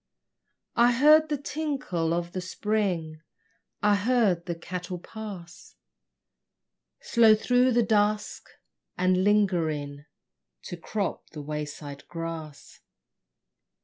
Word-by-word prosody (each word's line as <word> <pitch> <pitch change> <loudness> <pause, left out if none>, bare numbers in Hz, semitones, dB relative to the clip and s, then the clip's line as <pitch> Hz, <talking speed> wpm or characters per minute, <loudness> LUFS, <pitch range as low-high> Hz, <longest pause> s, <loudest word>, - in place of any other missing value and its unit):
I 240 +1 +5
heard 305 +5 +6
the 295 - 0
tinkle 275 - -2
of 170 0 -2
the 185 - -4
spring, 180 -5 -2 0.6
I 210 0 +5
heard 205 -5 +1
the 170 - -2
cattle 180 +2 -6
pass 185 -3 -10 1.2
Slow 225 -2 +5
through 250 +3 +2
the 240 0 +3
dusk, 210 -1 0 0.5
and 185 +1 +2
lingering 160 -9 +1 0.6
To - - -6
crop 200 +3 -4
the 150 -2 -8
wayside 145 -1 -6
grass. 165 -3 -7
185 Hz, 100 wpm, -27 LUFS, 165-220 Hz, 1.2 s, heard